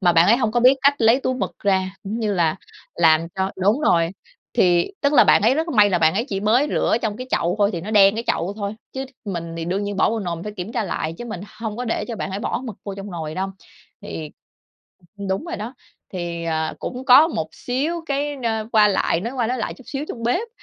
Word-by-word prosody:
mà 175 -3 +4
bạn 165 +1 +5
ấy 230 - +6
hông 225 -4 0
có 240 - +2
biết 255 +3 +7
cách 280 +1 +5
lấy 230 +3 +4
túi 255 - -1
mực 255 - -4
ra, 190 -1 0
cũng 215 +3 -4
như 215 -2 0
là 165 -4 +1 0.4
làm 165 -1 +4
cho 190 0 -1
đúng 205 +8 +2
rồi. 170 - +3 0.4
Thì, 175 - +3
tức 285 0 +2
là, 270 - +7
bạn - - +5
ấy 230 +5 +4
rất 320 +3 -1
may 210 -9 +4
là 180 - +2
bạn 160 0 +3
ấy 225 +4 0
chỉ 195 -6 -2
mới 230 +7 +3
rửa - - +2
trong 215 -3 -1
cái 255 - -7
chậu 175 +1 +1
thôi 205 -1 +3
thì 170 - -3
nó 195 +6 -6
đen 200 -2 +6
cái 230 +1 -3
chậu 175 +4 0
thôi. 200 0 -3 0.2
Chứ 265 0 -4 0.2
mình 170 -5 -5
thì 165 - -4
đương 185 +4 -1
nhiên 205 0 -4
bỏ 190 - +3
vô 225 - -1
nồi 170 -4 -4
phải 210 - -5
kiểm 185 +5 -5
tra 230 -3 -1
lại 165 -3 -3
chứ - - -6
mình 220 -7 -6 0.2
hông 220 -2 -4
có 250 - -3
để 230 - -1
cho 230 - -4
bạn - - -4
phải 190 - -3
bỏ 235 - -2
mực 225 -6 -6
vô 200 - -5
trong 200 +1 -8
nồi 160 -3 -5
đâu. 190 +2 -2 0.5
Thì 155 -2 -6 0.9
ừm, 200 -1 -5
đúng 190 +9 -1
rồi 340 - -5
đó, 225 +5 -6 0.4
thì, 170 -2 -4
à, 160 -1 -1
cũng 255 +1 -5
có 275 +5 +7
một 160 - -3
xíu 300 +7 -2
cái, 285 +1 -1
a, 220 -2 -1
qua 215 -2 +6
lại 190 -4 +1
nói 230 +6 -4
qua 245 -3 0
nói 250 +2 -1
lại 220 - -3
chút 260 - -16
xíu 280 +1 -4
trong 230 - -6
bếp. 350 - 0
210 Hz, 260 wpm, -22 LUFS, 180-245 Hz, 0.9 s, biết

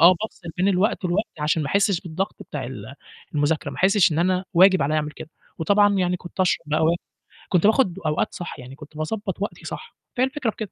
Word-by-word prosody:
آه 175 +3 +8
بافصل 205 -5 -7
بين 185 +2 +2
الوقت 195 +1 +1
والوقت 180 -2 -2
عشان 155 +1 +1
ما 145 - -3
أحسش 200 0 +2
بالضغط 190 +2 -4
بتاع 145 - -6
ال 120 0 -8 0.4
المذاكرة، 150 +1 0
ما - - -9
أحسش 195 -2 +4
إن 155 - -1
أنا 185 +2 +1
واجب 185 0 +6
عليّا 150 +3 +1
أعمل 150 -1 -1
كده، 155 - -10 0.3
وطبعًا 205 +5 +4
يعني 180 -1 +1
كنت 180 +2 -8
أشرب 185 -2 +2
بقى 155 +1 +1
و 165 +2 +4 0.6
كنت 180 0 +4
باخد 215 -5 +3
أوقات 150 -1 0
صح، 175 - -7
يعني 130 +1 -10
كنت 150 +1 -13
باضبّط 190 +4 -3
وقتي 205 - -4
صح. 465 - -7 0.2
فهي 255 - +4
الفكرة 265 -2 -2
في - - -5
كده، 215 -4 -6
180 Hz, 220 wpm, -23 LUFS, 155-200 Hz, 0.6 s, آه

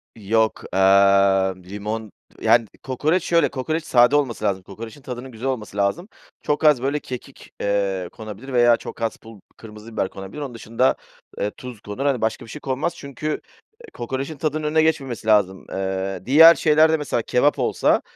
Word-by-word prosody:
Yok, 110 +1 0
aaa, 95 0 +4
limon 105 +3 -5 0.3
Yani, 115 -1 +4 0.2
kokoreç 155 +7 0
şöyle, 170 -1 +2
kokoreç 155 +4 -3
sade 120 +3 +4
olması 130 -7 0
lazım, 95 -2 -1
kokorecin 110 +7 -10
tadının 125 0 -7
güzel 115 +3 -5
olması 110 -6 -4
lazım. 100 - 0 0.3
Çok 150 +1 -1
az, 150 -5 +5
böyle, 140 +3 0
kekik, 125 -3 -10
eee, 100 -3 -1
konabilir 110 +5 -9
veya 120 -1 +5
çok - - -9
az 115 -1 -2
pul 115 -2 -14 0.2
kırmızı 110 0 -12
biber 95 - -1
konabilir. 95 +9 -9
Onun 135 -4 -5
dışında, 115 +2 0 0.4
eee, 105 - -1
tuz 125 -4 -9
konur, 105 +7 -5
hani, 135 -4 +1
başka 110 +2 -2
bir - - -15
şey 150 - -8
konmaz 140 +5 -2
çünkü, 140 -1 -7 0.5
eee, 475 - -14
kokorecin 135 +5 -5
tadının 155 +1 -2
önüne 155 +1 +2
geçmemesi 135 -8 -1
lazım. 100 -3 +2
Eee, 95 0 -3
diğer 160 +6 +9
şeylerde 155 0 +4
mesela 145 -6 -2
kebap 145 +6 +2
olsa, - - +2
120 Hz, 170 wpm, -22 LUFS, 105-140 Hz, 0.5 s, diğer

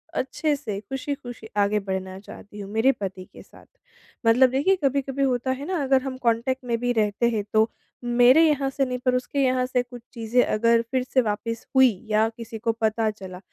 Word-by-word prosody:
अच्छे 290 +3 -1
से 215 -8 -5
खुशी-खुशी 250 -1 -6
आगे 205 +1 +2
बढ़ना 190 -1 -5
चाहती 205 +1 -12
हूँ, 195 - -7
मेरे 235 +5 +4
पति 190 -5 -6
के - - -12
साथ। - - -19 0.6
मतलब 245 +3 +5
देखिए, 285 +9 +2
कभी-कभी 275 0 0
होता 260 -1 0
है 265 +2 -4
ना, 360 -5 -1
अगर 265 -1 +3
हम 260 -1 -5
कॉन्टैक्ट 255 +2 0
में 235 -1 0
भी 245 0 0
रहते 215 +1 +1
हैं, 215 -3 -1
तो 220 +1 +4 0.3
मेरे 245 +6 +5
यहाँ 280 -2 +1
से 270 0 0
नहीं, 250 0 -3
पर 250 0 +1
उसके 250 +3 -2
यहाँ 255 -1 +2
से 250 -1 0
कुछ 245 -1 -12
चीज़ें 235 +1 +1
अगर 230 +2 +2
फिर 260 -1 +1
से 260 0 +2
वापस 230 +1 -3
हुईं, 245 -6 +4
या 215 +1 +3
किसी 230 -1 -7
को 230 +1 0
पता 220 0 0
चला, 190 -3 -10
245 Hz, 200 wpm, -24 LUFS, 220-260 Hz, 0.6 s, मतलब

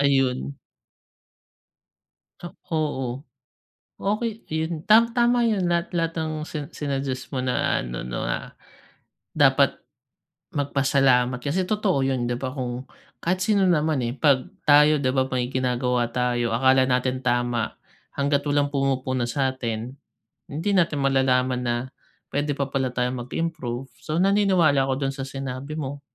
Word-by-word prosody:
Ayun. 135 -1 +1 1.9
Ah, 175 - -8 0.2
oo. 135 -6 -1 0.8
Okey 215 +2 -2
yun 160 0 -2
tam 225 +2 +6
tama 240 0 +4
yun. 200 -4 +1
Lahat-lahat 170 -1 0
ng 155 -1 -3
sina 150 -2 -6
sinuggest 135 -2 -4
mo 130 - -1
na 125 -1 0
ano, - - -5
na - - -3 0.9
dapat - - +4 0.8
magpasalamat 135 -3 +2
kasi, 180 +6 -1
totoo 205 -8 +1
yun 135 -2 0
'di 120 0 -2
ba? 130 +1 -4
Kung 125 0 -4 0.3
kahit 185 +2 0
sino 200 -3 +3
naman, 155 -4 +2
eh, 120 - -4
pag 135 -1 +3 0.2
tayo 150 0 +6
'di 130 - +2
ba, 130 0 +1
may 125 -1 -2
ginagawa 125 -1 0
tayo 120 -2 0
akala 130 +1 +4
natin 130 0 0
tama. 120 -2 0 0.4
Hangga't 140 +1 0
walang 145 0 +1
pumupuna 130 -3 0
sa'tin, 125 -3 -2 0.6
hindi 160 +8 -2
natin 165 -5 +2
malalaman 130 -2 +2
na, 120 -1 0 0.6
pwede 145 +1 0
pa 140 -1 -1
pala 130 -2 0
tayong 125 0 -2
mag-improve. 135 -5 -3
So, 155 - -4
naniniwala 185 -7 +4
ako 135 +1 -1
dun 135 - -2
sa 135 - -4
sinabi 135 +2 -5
mo. 140 0 -5
135 Hz, 135 wpm, -24 LUFS, 125-155 Hz, 1.9 s, tam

